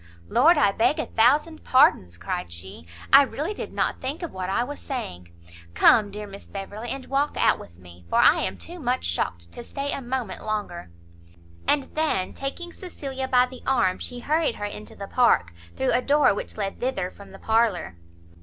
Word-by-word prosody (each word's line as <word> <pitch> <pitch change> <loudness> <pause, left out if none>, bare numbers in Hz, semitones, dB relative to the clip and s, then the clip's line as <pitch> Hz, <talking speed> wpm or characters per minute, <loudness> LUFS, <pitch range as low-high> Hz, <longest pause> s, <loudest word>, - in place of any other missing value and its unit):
"Lord, 310 +8 +5
I 205 - +4
beg 230 +9 +2
a 310 - -1
thousand 300 +8 +2
pardons!" 90 - +4
cried 85 0 -4
she, 85 -1 -10 0.3
"I 275 - +11
really 295 +7 -2
did - - -6
not - - -1
think 280 +7 -4
of 340 - -4
what 185 -1 -4
I 195 - +1
was 290 +4 -7
saying. 90 - -6 0.4
Come, 205 - +5
dear 210 +1 -7
Miss 200 0 -11
Beverley, 205 +4 -6
and 270 +1 -3
walk 280 +2 0
out - - +3
with 85 - -13
me, 90 -1 -15
for - - +1
I - - +6
am - - -2
too 350 +1 -9
much 255 -3 -1
shocked 85 0 -3
to - - -8
stay 280 +3 -4
a 275 - -3
moment 245 -5 -4
longer." 205 - -4 0.8
And 290 -2 +3
then, 305 -12 0
taking 345 +6 -5
Cecilia 270 -7 -5
by 250 -1 +4
the 255 0 -11
arm, 190 -9 +2
she 245 -1 -5
hurried 305 -1 +1
her 205 - -4
into 210 +1 -7
the 200 - -7
park, 90 - +3 0.2
through 130 - +1
a 250 - +2
door 290 -1 +4
which 205 - -6
led 195 -2 -3
thither 195 -8 -2
from 200 -1 -14
the 195 - -11
parlour. 220 - +1
235 Hz, 195 wpm, -25 LUFS, 190-275 Hz, 0.8 s, I